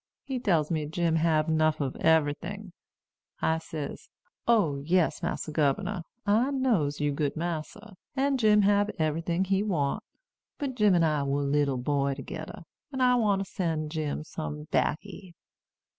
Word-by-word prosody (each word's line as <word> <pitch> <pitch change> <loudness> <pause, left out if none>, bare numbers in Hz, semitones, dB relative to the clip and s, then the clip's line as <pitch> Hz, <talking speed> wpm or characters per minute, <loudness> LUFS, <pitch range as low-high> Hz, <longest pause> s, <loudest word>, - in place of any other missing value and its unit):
He 265 -2 -3
tells 170 -10 +1
me 155 -2 -1
Jim 165 +1 +1
hab 160 -1 +2
'nuff 155 -1 +2
ob 135 -3 -2
eberyting. 165 +6 +1 0.7
I 160 0 +1
says, 155 -2 -7 0.4
'O 205 -12 +3
yes, 165 +4 +1
Massa 155 - -3
Gubernor, 155 +6 0 0.2
I 220 +6 +3
knows 225 - +1
you 145 -1 +1
good 145 0 -1
massa, 175 +6 -5 0.2
and 275 0 +1
Jim 210 -2 +5
hab 205 +1 +3
eberyting 165 +3 0
he 195 +1 +1
want. 160 -10 0 0.6
But 280 -2 -3
Jim 210 -6 +4
an' 170 - +4
I 155 -2 +2
was 140 +1 0
leetle 140 -1 +1
boy 140 +1 0
togeder, 160 +5 -7 0.3
and 265 -2 0
I 250 0 +5
wants 200 -5 +1
to - - -22
sen' 160 -4 -1
Jim 155 -1 -3
some 150 -1 -6
backy.' 185 0 -2
165 Hz, 155 wpm, -28 LUFS, 150-205 Hz, 0.7 s, Jim